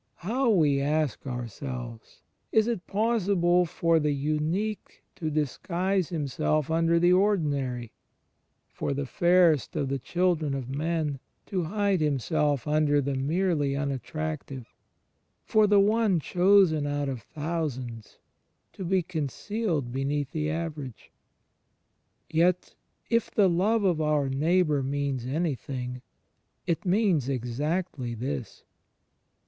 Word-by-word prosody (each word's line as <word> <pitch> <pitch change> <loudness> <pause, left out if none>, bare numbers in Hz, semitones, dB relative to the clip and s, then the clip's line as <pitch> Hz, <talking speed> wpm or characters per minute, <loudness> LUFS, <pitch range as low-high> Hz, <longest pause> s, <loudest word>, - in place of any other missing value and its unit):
How, 245 +5 +1
we 150 -9 +3
ask 150 -2 -1
ourselves, 120 -1 -7 0.3
is 220 0 +3
it 230 -7 -3
possible 195 -5 +2
for 165 0 +2
the 150 -1 +1
Unique 155 +9 -2
to 160 -4 -3
disguise 175 +5 -1
Himself 150 -1 -1
imder 165 +1 +3
the 175 +1 +4
Ordinary, 145 - 0 0.7
for 140 - -3
the 140 0 -2
Fairest 170 0 +3
of 135 - -1
the 135 0 -1
children 160 -1 0
of 130 -3 -4
men 150 -1 -1 0.3
to 185 -4 -2
hide 200 0 0
Himself 145 -1 +1
imder 150 -2 +2
the 140 - -1
merely 145 +1 0
unattractive, 140 -1 -4 0.7
for 215 -1 +4
the 205 0 +5
One 210 -2 +3
"chosen 180 -3 +3
out 145 0 -1
of 130 -4 -4
thousands" 145 -8 -5 0.5
^ - - -49
to 190 - -7
be 185 0 +1
concealed 160 - -2
beneath 140 +2 -2
the 155 -1 -2
Average? 155 -6 -5 1.2
Yet, 170 +3 +1 0.4
if 230 -1 +2
the 200 -3 +3
love 200 +6 +2
of 175 -5 +2
our 150 -3 +1
neighbour 155 +1 +2
means 135 -2 -2
any 155 +3 0
thing, 125 -1 -6 0.6
it 170 +4 -1
means 180 - +2
exactly 135 +1 -2
this. 125 -1 -5
155 Hz, 120 wpm, -27 LUFS, 140-180 Hz, 1.2 s, the